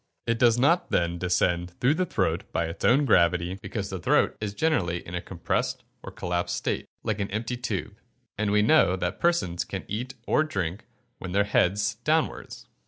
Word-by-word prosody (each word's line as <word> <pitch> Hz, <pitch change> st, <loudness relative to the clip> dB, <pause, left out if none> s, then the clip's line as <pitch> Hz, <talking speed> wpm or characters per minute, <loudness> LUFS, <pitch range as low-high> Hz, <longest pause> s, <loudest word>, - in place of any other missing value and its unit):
It 115 Hz, 0 st, 0 dB
does 120 Hz, -2 st, +5 dB
not 160 Hz, +8 st, +3 dB
then 85 Hz, 0 st, 0 dB
descend 90 Hz, -1 st, 0 dB
through 125 Hz, +4 st, +3 dB
the 180 Hz, +3 st, -1 dB
throat 95 Hz, -, -1 dB
by 85 Hz, -, 0 dB
its 80 Hz, +2 st, -7 dB
own 140 Hz, +4 st, +4 dB
gravity, 90 Hz, -3 st, +2 dB
because 100 Hz, 0 st, -4 dB
the 95 Hz, -, -4 dB
throat -, -, +2 dB
is 105 Hz, -1 st, -3 dB
generally 95 Hz, -, 0 dB
in 85 Hz, -, -9 dB
a 90 Hz, -, -2 dB
compressed 85 Hz, -2 st, -2 dB, 0.2 s
or -, -, -8 dB
collapsed 90 Hz, 0 st, -2 dB
state, -, -, -2 dB, 0.2 s
like 110 Hz, -2 st, -1 dB
an 100 Hz, -, -2 dB
empty 110 Hz, +4 st, -3 dB
tube; 120 Hz, 0 st, -4 dB, 0.4 s
and 105 Hz, 0 st, -1 dB
we 105 Hz, 0 st, +3 dB
know 110 Hz, -, +5 dB
that 90 Hz, +1 st, -3 dB
persons 170 Hz, -, +1 dB
can 95 Hz, -, -6 dB
eat 120 Hz, +5 st, -4 dB
or 155 Hz, -, +3 dB
drink 95 Hz, -, -3 dB, 0.3 s
when 95 Hz, -, -6 dB
with -, -, -6 dB
their 100 Hz, -, +4 dB
heads 105 Hz, +2 st, +1 dB
downwards. 155 Hz, +1 st, -1 dB
100 Hz, 190 wpm, -26 LUFS, 90-120 Hz, 0.4 s, does